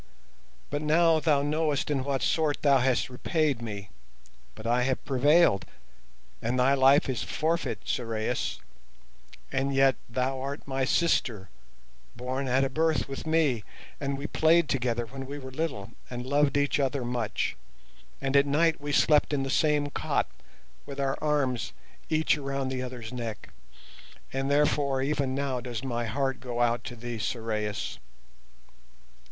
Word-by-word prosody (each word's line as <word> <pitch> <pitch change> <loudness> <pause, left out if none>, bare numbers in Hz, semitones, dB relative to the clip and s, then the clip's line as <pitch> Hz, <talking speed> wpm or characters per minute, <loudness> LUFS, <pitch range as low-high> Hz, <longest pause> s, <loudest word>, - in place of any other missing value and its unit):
But 145 +1 -1
now 160 +1 +4
thou 145 -2 +2
knowest 150 -1 0
in 135 -3 0
what 135 -1 -1
sort 155 -3 +1
thou 140 -2 +5
hast 130 0 +2
repaid 145 -1 0
me, 100 -5 -6 0.6
but 110 - -11
I 120 +2 +2
have 130 +1 -1
prevailed, 140 - +4 0.8
and 120 +3 0
thy 130 +2 +4
life 135 +1 +5
is 130 -3 -1
forfeit, 160 -9 -1
Sorais. 115 0 -1 0.9
And 135 0 0
yet 135 -2 +4 0.2
art 135 +2 -1
thou - - -26
my 135 -1 -1
sister, 120 - +1 0.7
born 130 +3 -3
at 130 +2 +3
a 135 - +1
birth 160 +2 +1
with 135 +3 -6
me, 155 -9 +2 0.4
and 140 -1 -2
we 140 - -6
played 160 +1 +3
together 120 -2 0
when 135 +2 -8
we 145 +1 -5
were 130 -2 -8
little 135 -8 -3 0.2
and 125 0 -5
loved 145 +1 +2
each 145 0 +1
other 135 -2 0
much, 120 -3 -1 0.6
and 135 0 -1
at 140 0 +5
night 160 +2 +2
we 145 0 -3
slept 150 0 +4
in 135 -2 +1
the 135 - -2
same 150 -1 +2
cot - - 0 0.6
with 140 0 -7
our 135 -1 +1
arms 135 -7 0 0.4
each 155 -1 +2
around 135 -1 -2
the 130 -1 -2
other's 125 -2 -6
neck, 115 -3 -5 0.8
and 135 +1 -1
therefore 140 -2 +2
even 140 -2 0
now 135 -2 -1
does 120 -2 -5
my 120 -3 -2
heart 135 +2 -1
go 120 -2 -5
out 120 0 +2
to 120 - -6
thee, 120 -1 -6
Sorais. 105 -2 -3
135 Hz, 155 wpm, -28 LUFS, 125-145 Hz, 0.9 s, thou